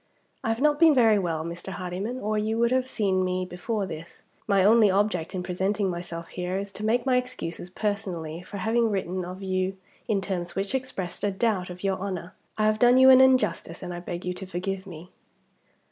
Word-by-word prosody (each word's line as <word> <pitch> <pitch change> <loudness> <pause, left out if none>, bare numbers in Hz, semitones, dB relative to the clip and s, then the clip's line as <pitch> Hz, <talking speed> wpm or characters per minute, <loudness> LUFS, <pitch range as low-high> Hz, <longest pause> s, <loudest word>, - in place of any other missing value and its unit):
"I - - -1
have 225 +3 -1
not 295 0 +3
been 325 -3 +7
very 225 -4 +5
well, 165 -4 -2
Mr. 170 +3 -6
Hardyman, 185 +8 -4
or 215 -2 -1
you 215 +1 0
would 235 +1 +2
have 255 0 +1
seen 190 -6 +1
me 185 0 -1
before 195 +4 -3
this. 165 -2 -9 0.2
My 200 -3 +4
only 215 +1 +6
object 190 -3 0
in 180 - -2
presenting 190 +2 0
myself 170 -1 -6
here 180 +1 -3
is 200 0 -5
to 210 - -7
make 235 +3 +1
my 255 -2 +3
excuses 250 -9 -4
personally 185 -5 -3
for 200 +3 -8
having 225 +3 +1
written 185 -2 -2
of 185 +2 -7
you 185 0 -1 0.3
in 210 -3 +1
terms 180 -3 -4
which 195 +3 -2
expressed 225 -10 -4
a 205 - +2
doubt 195 -2 0
of 180 +1 -9
your 195 -1 0
honor. 185 -2 -5 0.2
I 215 - +2
have 215 0 +2
done 245 +2 +6
you 260 0 +8
an 260 0 +8
injustice, 255 -10 +2
and 180 -1 -5
I 175 - -5
beg 175 0 -6
you 180 - -1
to 190 +1 -8
forgive 190 +2 -4
me." 175 0 -10
195 Hz, 210 wpm, -26 LUFS, 180-220 Hz, 0.3 s, you